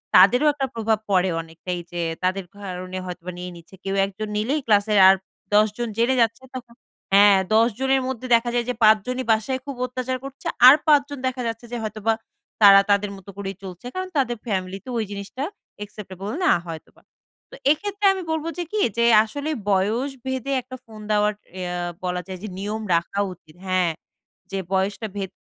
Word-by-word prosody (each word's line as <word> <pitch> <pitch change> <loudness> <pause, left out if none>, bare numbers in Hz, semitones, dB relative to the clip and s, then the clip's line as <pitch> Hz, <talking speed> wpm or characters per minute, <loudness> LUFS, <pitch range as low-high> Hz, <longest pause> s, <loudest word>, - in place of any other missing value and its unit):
তাদেরও 245 +11 +7
একটা 275 -2 -2
প্রভাব 220 -1 +1
পড়ে 185 0 +3
অনেকটাই 165 +2 -6
যে 175 0 -3 0.2
তাদের 185 0 0
কারণে 185 -1 -6
হয়তোবা 180 0 -6
নিয়ে 180 0 -6
নিচ্ছে 170 +3 -14
কেউ 195 0 -2
একজন 200 +2 -6
নিলেই 270 +8 0
ক্লাসের 210 -1 +4
আর 190 - +8 0.4
১০ 210 +1 +6
জন 240 -1 -2
জেনে 240 +3 +3
যাচ্ছে 230 +2 +1
তখন 240 -2 -8 0.4
হ্যাঁ 200 0 +7 0.2
দশজনের 250 +4 +2
মধ্যে 255 -1 -4
দেখা 235 +1 +1
যায় 240 -1 +1
যে 250 - +1
৫ 215 0 +7
জনই 255 0 -2
বাসায় 225 +4 0
খুব 280 -1 -5
অত্যাচার 255 +1 -3
করছে 275 0 -8 0.2
আর 260 - +11
৫ 295 -2 +7
জন 285 - -6
দেখা 255 0 -3
যাচ্ছে 225 +1 -5
যে 240 - -3
হয়তোবা 215 +1 -1 0.5
তারা 200 -1 +9
তাদের 200 0 +2
মতো 195 +1 -14
করেই 195 -1 -5
চলছে 185 +3 -9
কারণ 370 0 -3
তাদের 245 -4 +1
ফ্যামিলিতে 190 +2 -3
ওই 225 - +1
জিনিসটা 200 +6 -6 0.4
acceptable 200 0 -7
না - - +5 0.2
হয়তোবা। 160 -1 -9 0.5
তো - - -10 0.2
এক্ষেত্রে 405 +5 -1
আমি 380 -2 -5
বলব 320 0 -2
যে 350 - -1
কি? 425 - 0 0.2
যে 235 - +3 0.2
আসলেই 285 +6 -4
বয়স 220 +9 +1
ভেদে 260 0 -3
১ - - -31
টা 255 - -5
ফোন 220 -1 -12
দেওয়ার 210 0 +3 0.3
ইয়া 180 -1 -3 0.3
বলা 180 0 -1
যায় 185 -1 -7
যে 215 - -4
নিয়ম 210 +2 -3
রাখা 170 +4 -1
উচিত। 155 -3 -21
হ্যাঁ, 185 -2 +2 0.6
যে 195 - -2 0.2
বয়সটা 200 +3 0
ভেদ 195 -2 -4
215 Hz, 185 wpm, -23 LUFS, 190-255 Hz, 0.6 s, আর